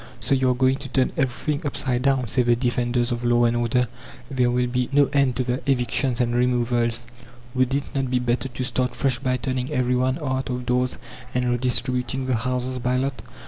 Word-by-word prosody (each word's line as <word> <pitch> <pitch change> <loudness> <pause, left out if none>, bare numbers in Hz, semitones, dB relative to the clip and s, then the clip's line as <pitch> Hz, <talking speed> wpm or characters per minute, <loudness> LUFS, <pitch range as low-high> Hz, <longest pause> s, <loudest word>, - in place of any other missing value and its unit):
"So 115 +4 0
you 130 -1 +3
are 125 - +2
going 130 +1 +2
to 135 -1 -8
turn 130 0 +1
everything 140 +3 -1
upside 130 -3 0
down," 135 -1 +2
say 125 +4 +1
the 120 -1 +3
defenders 120 0 0
of 120 0 -2
law 120 0 +3
and 120 0 +2
order. 120 +1 +1 0.4
"There 125 -2 +2
will 125 0 +1
be 125 0 -1
no 145 0 +5
end 140 -3 +3
to 130 - 0
the 125 +1 -2
evictions 125 0 +1
and 120 -1 +1
removals. 120 -1 +1 0.5
Would 130 0 +1
it 140 - 0
not 135 -2 -1
be 125 - +1
better 125 +2 -1
to 130 0 -4
start 125 0 -1
fresh 130 -3 0
by 130 -2 0
turning 130 0 -2
everybody 130 -1 +1
out 130 -4 -2
of 125 0 -3
doors 125 +1 0 0.4
and 125 0 +1
redistributing 125 +1 0
the 130 - 0
houses 125 +2 -2
by 125 +1 0
lot?" 135 0 -2
125 Hz, 205 wpm, -23 LUFS, 120-130 Hz, 0.5 s, no